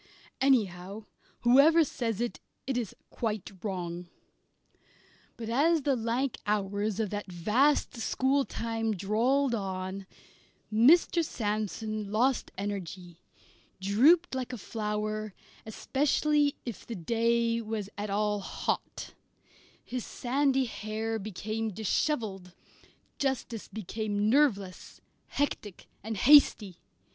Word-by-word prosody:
Anyhow, 210 -6 +1 0.4
whoever 285 +7 +6
says 230 -7 -3
it, 240 - -2 0.3
it 265 - -2
is 240 -5 -3 0.2
quite 215 -5 -3
wrong. 180 -3 -4 1.3
But 225 - -6
as 295 +7 +2
the 275 -1 +2
lank 240 +3 -1
hours 205 0 -1
of 215 -3 -1
that 205 -2 -5
vast 225 - +2
schooltime 230 -3 0
drawled 240 +8 +1
on, 190 -2 -4 0.7
Mr. 330 +9 +5
Sandsome 215 -3 -3
lost 245 +5 +1
energy, 180 -3 -5 0.6
drooped 270 - +4
like 255 -1 -3
a 250 - -5
flower, 215 0 -3 0.3
especially 290 +5 +1
if 235 -5 -6
the 235 - -6
day 230 +4 +1
was 215 -2 -4
at 205 +1 -4
all 210 +1 0
hot, - - -4 0.7
his 250 -1 -4
sandy 270 +1 +1
hair 220 0 -3
became 215 +2 -3
dishevelled, 205 - -2 0.6
justice 260 -5 -2
became 215 0 -2
nerveless, 205 -10 +1 0.3
hectic, 215 -9 -3 0.2
and 220 0 -4
hasty. 215 - +5
220 Hz, 100 wpm, -29 LUFS, 205-255 Hz, 1.3 s, whoever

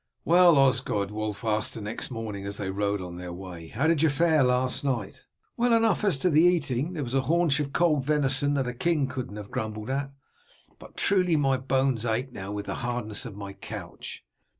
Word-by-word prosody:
"Well, 175 -2 +6
Osgod," 125 -7 +2
Wulf 110 +1 -4
asked 110 -1 0
the - - -5
next 105 +2 -5
morning 110 -5 -5
as 100 0 -4
they 95 -2 -3
rode 100 0 -1
on 90 -1 -7
their 90 0 -6
way, 90 -2 -8
"how 130 - -2
did 160 -2 +3
you 160 - +4
fare 160 +1 +3
last 125 +1 +1
night?" 125 -8 -3 0.3
"Well 240 0 +3
enough 225 -2 +3
as 195 -9 +3
to 180 +5 +2
the 155 +1 +5
eating, 160 -3 +2
there 155 -4 -3
was 120 -1 -5
a 135 - +3
haunch 160 0 +2
of 140 -2 -2
cold 155 -4 +2
venison 145 0 +1
that 135 -2 0
a 125 - -3
king 150 +1 +1
needn't 125 -5 -5
have 105 -1 -9
grumbled 110 +2 -4
at, 135 0 -2 0.7
but - - -14
truly 185 -4 +3
my 135 -3 +2
bones 130 -2 0
ache 120 +3 -1
now 95 -4 -7
with 105 0 -4
the 100 - -3
hardness 120 -2 -3
of 110 - -9
my 100 -1 -7
couch. 95 - -8
130 Hz, 210 wpm, -27 LUFS, 105-150 Hz, 0.7 s, Well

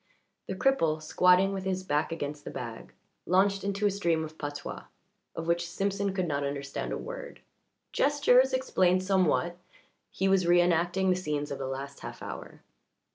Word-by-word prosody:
The 190 - -3
cripple, 165 -10 +2
squatting 180 +4 +4
with 190 -1 -4
his 190 -1 -2
back 150 -2 0
against 145 -2 -4
the - - -6
bag, 115 -2 -7 0.3
launched 195 +2 +3
into 200 +1 -1
a 205 - +4
stream 170 -5 0
of 155 0 -11
patois, 145 -1 -6 0.5
of 165 - -4
which 170 0 0
Simpson 200 +2 -1
could 185 -2 -1
not 145 -2 -1
understand 140 0 -4
a - - -2
word. - - -8 0.5
Gestures 265 -2 +4
explained 185 -8 +2
somewhat; 185 -2 +1 0.5
he 190 - -1
was 190 -2 +3
reënacting 175 +2 +3
the 185 - +4
scenes 150 -5 -3
of 140 - -4
the 135 - -3
last 135 +1 -6
half - - -8
hour. - - -8
180 Hz, 165 wpm, -29 LUFS, 155-195 Hz, 0.5 s, squatting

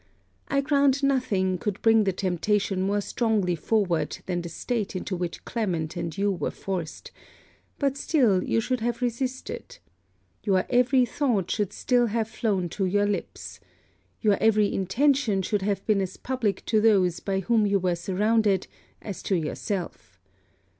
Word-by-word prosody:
I 275 0 +1
grant 280 -1 +2
nothing 200 -10 +1
could 205 0 -3
bring 225 -1 +5
the 195 - +2
temptation 190 +1 0
more 200 +2 +1
strongly 210 -5 0
forward 185 -2 0
than 175 -2 -2
the 170 - -6
state 215 +3 -3
into 185 +1 -3
which 175 -1 -5
Clement 175 -9 -2
and 170 -2 -4
you 200 +1 +1
were 185 - -2
forced: 180 -5 -5 0.7
but 275 -1 0
still 235 - +2
you - - +1
should 255 +2 -1
have 240 +2 -2
resisted. 250 +2 -4 0.7
Your 190 -2 +2
every 250 +1 +4
thought 235 - 0
should 210 -4 -1
still 245 -2 +2
have 220 0 -1
flown 200 -5 -1
to 195 +3 -2
your 205 +2 +2
lips. 205 -1 -4 0.6
Your 210 -3 +3
every 215 -1 +3
intention 225 0 +1
should 205 +1 -1
have 195 0 -1
been 210 -3 +2
as 190 -1 -4
public 245 -7 -2
to 220 -2 +2
those 190 -6 +3
by 195 -1 -2
whom 220 +1 +2
you 200 0 +3
were 180 -2 0
surrounded 200 +2 +1 0.4
as 200 -4 -6
to 195 - 0
yourself. 170 - -4
205 Hz, 155 wpm, -26 LUFS, 185-235 Hz, 0.7 s, bring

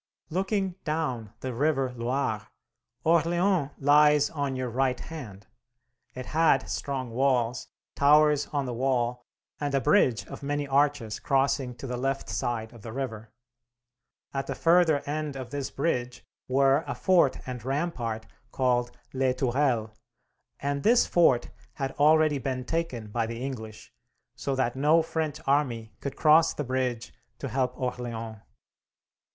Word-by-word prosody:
Looking 190 +1 -1
down 130 - -2
the 130 -1 -4
river 135 0 +1
Loire, 120 -2 -2 0.6
Orleans 170 0 +2
lies 150 +1 +5
on 140 -3 -2
your 130 -2 -3
right 130 +1 0
hand. 110 -12 -9 0.7
It 130 0 -6
had 155 -4 +2
strong 130 -4 -3
walls, 125 -1 +1 0.3
towers 150 0 +4
on 145 -2 -2
the 125 - -3
wall, 125 -1 -1 0.3
and 145 -1 -1
a - - +4
bridge 130 - +3
of - - -9
many 145 0 -2
arches 140 -5 +1
crossing 135 -3 +1
to 125 - -9
the 125 -1 -3
left 135 +2 -2
side 115 -1 -2
of 120 - -13
the 110 - -8
river. 115 -4 -5 1.0
At 135 0 -3
the 135 - -3
further 165 -1 +4
end 150 -1 -3
of 130 -3 -7
this 140 -2 -3
bridge 125 -5 -2 0.2
were 135 +3 +3
a - - -3
fort 175 -8 +3
and 125 -3 -6
rampart 130 -6 -2 0.3
called 125 -2 +1 0.2
Les 130 -1 +1
Tourelles, 125 -3 +1 0.7
and 140 0 -2
this 235 - +5
fort 135 -9 +3 0.2
had 135 +1 -3
already 155 -1 +4
been 130 -1 -3
taken 125 -9 -3
by 115 0 -1
the 115 0 -5
English, 110 -5 -7 0.4
so 140 - -2
that 130 -2 0
no 150 +4 +4
French 160 -2 -3
army 125 -6 0
could 140 - -5
cross 155 +1 +5
the 150 - -2
bridge 125 -3 -2 0.2
to 135 - -5
help 130 +2 -1
Orleans. 115 -3 -4
135 Hz, 145 wpm, -27 LUFS, 125-150 Hz, 1.0 s, lies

